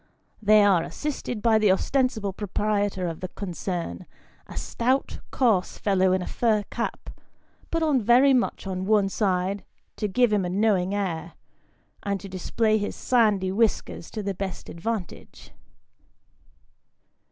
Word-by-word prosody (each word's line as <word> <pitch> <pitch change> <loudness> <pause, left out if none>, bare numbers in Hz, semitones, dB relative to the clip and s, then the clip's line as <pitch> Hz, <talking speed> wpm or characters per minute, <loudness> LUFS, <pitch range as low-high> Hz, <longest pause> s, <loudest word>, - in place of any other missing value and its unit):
They 210 0 +6
are 190 -4 +4
assisted 250 - -4
by 225 -2 +4
the 210 -3 +4
ostensible 220 -1 0
proprietor 205 -1 -1
of 165 -1 -5
the 185 - -4
concern, 175 - -5 0.4
a - - -9
stout 255 +3 -1
coarse 220 -8 +1
fellow 190 -2 +2
in 185 0 +1
a - - -5
fur 220 -3 +1
cap, - - -4 0.6
pnt 330 - 0
on 290 -5 +2
very 245 +5 +5
much 245 -4 0
on 190 0 -3
one 205 -2 +3
side 190 -1 0 0.3
to 210 - -1
give 225 +3 +2
him 205 -2 +2
a 180 - -2
knowing 195 -1 +1
air, 170 -4 -3 0.7
and 200 -1 -2
to 200 - -9
display 215 +4 0
his 205 - -3
sandy 210 -6 +2
whiskers 215 -4 0
to 215 - -5
the 200 0 -2
best 190 0 -6
advantage. 195 +1 -6
205 Hz, 140 wpm, -25 LUFS, 185-225 Hz, 0.7 s, They